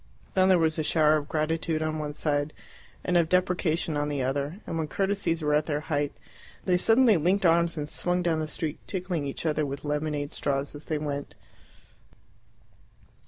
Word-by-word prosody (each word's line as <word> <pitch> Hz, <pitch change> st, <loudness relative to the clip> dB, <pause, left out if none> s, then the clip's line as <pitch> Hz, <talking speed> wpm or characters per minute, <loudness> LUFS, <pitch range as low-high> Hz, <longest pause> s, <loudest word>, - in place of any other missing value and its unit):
Then 185 Hz, 0 st, +4 dB
there 185 Hz, -, +6 dB
was 160 Hz, -1 st, +1 dB
a -, -, +1 dB
shower 155 Hz, 0 st, +4 dB
of 145 Hz, -1 st, -5 dB
gratitude 160 Hz, +1 st, 0 dB
on 155 Hz, 0 st, -2 dB
one 150 Hz, -1 st, -4 dB
side 145 Hz, 0 st, 0 dB, 0.5 s
and 180 Hz, -, 0 dB
of 165 Hz, -2 st, +2 dB
deprecation 175 Hz, -3 st, +1 dB
on 145 Hz, 0 st, 0 dB
the 140 Hz, -3 st, -1 dB
other, 140 Hz, +7 st, -2 dB
and 165 Hz, -, -3 dB
when 155 Hz, -, -1 dB
courtesies 190 Hz, -3 st, -1 dB
were 150 Hz, 0 st, +2 dB
at 150 Hz, 0 st, +2 dB
their 150 Hz, -1 st, -1 dB
height 145 Hz, 0 st, +1 dB, 0.5 s
they 180 Hz, -, +3 dB
suddenly 225 Hz, +2 st, +5 dB
linked 185 Hz, +5 st, +2 dB
arms 170 Hz, 0 st, +3 dB
and 150 Hz, -1 st, -3 dB
swung 180 Hz, +3 st, 0 dB
down 165 Hz, -2 st, +1 dB
the 155 Hz, -, -2 dB
street, 155 Hz, 0 st, -3 dB
tickling 180 Hz, -6 st, -2 dB
each 140 Hz, -, -6 dB
other 155 Hz, -1 st, +1 dB
with 140 Hz, 0 st, -5 dB
lemonade 150 Hz, -1 st, -2 dB
straws 140 Hz, 0 st, -2 dB
as 145 Hz, +1 st, -10 dB
they 155 Hz, -, -1 dB
went. 145 Hz, -1 st, -4 dB
155 Hz, 185 wpm, -27 LUFS, 145-170 Hz, 0.5 s, there